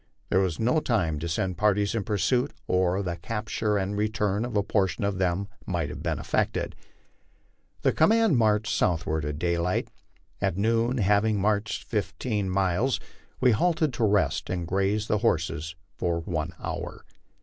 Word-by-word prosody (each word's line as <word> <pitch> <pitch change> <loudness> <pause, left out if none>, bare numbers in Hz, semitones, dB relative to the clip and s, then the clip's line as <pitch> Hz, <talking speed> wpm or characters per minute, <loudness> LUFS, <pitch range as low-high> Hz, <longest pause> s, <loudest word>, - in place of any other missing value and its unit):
There 95 - +3
was 95 -5 0
no 125 +7 +3
time 90 - 0
to 85 +3 -3
send 90 +2 -1
parties 105 -1 +2
in 115 -3 -1
pursuit, 120 - +1
or 90 +1 +1
the 85 -2 -3
capture 105 +2 -1
and 100 +1 -1
return 105 0 0
of 120 -4 -2
a 100 - +3
portion 100 +1 0
of 100 -2 -1
them 95 +1 0 0.2
might 85 -5 -1
have 75 - -7
been - - -1
effected. - - -1 1.1
The - - +4
command 220 0 +4
marched 110 0 +2
southward 80 -4 0
at 75 0 -3
daylight. 85 +2 0 0.5
At 85 - 0
noon, 115 +4 +2
having 105 0 +3
marched 105 +1 0
fifteen 105 -1 -2
miles, 95 +7 +1 0.4
we 125 - +5
halted 155 +4 +2
to 115 - -1
rest 105 -2 +2
and 90 -1 -2
graze 100 +4 +1
the 105 - +1
horses 80 -2 0 0.2
for 85 -1 0
one 80 -1 -3
hour. - - -5
100 Hz, 160 wpm, -27 LUFS, 90-110 Hz, 1.1 s, we